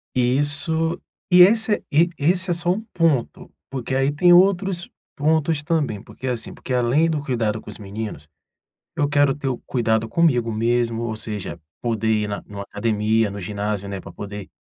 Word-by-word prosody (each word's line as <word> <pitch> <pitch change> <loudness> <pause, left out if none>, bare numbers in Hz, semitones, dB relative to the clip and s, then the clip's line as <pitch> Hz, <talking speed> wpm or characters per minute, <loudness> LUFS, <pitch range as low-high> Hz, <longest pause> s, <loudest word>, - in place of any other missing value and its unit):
E 125 +2 +2
isso 160 +3 -1 0.3
e 180 0 +8
esse 220 +1 +3
e 165 +4 +4
esse 180 +5 +2
é - - +3
só 175 +1 +1
um 210 +4 -1
ponto, 160 -8 0 0.2
porque 130 -1 -4
aí 135 +2 +2
tem 175 +4 +5
outros 185 -1 +3 0.3
pontos 155 0 +1
também, 145 - -1
porque, 130 +2 -11
assim, 120 -3 -3
porque 130 - -6
além 125 +7 +2
do 150 -3 -1
cuidado 110 -5 -1
com - - -12
os - - -8
meninos, 100 -7 -7 0.7
eu 145 - +1
quero 145 -1 +3
ter 140 -2 -5
o 125 - -1
cuidado 110 -3 0
comigo 125 -7 +2
mesmo, 115 +1 0
ou 110 -2 -3
seja, 105 -5 -5 0.2
poder 115 -2 -1
ir 105 -1 0
na 100 - -4
numa 100 -1 -7
academia, 105 +1 0
no 100 - -6
ginásio, 100 +1 -3
né, 100 -1 -4
para - - -10
poder 100 -1 -7
125 Hz, 180 wpm, -22 LUFS, 110-160 Hz, 0.7 s, e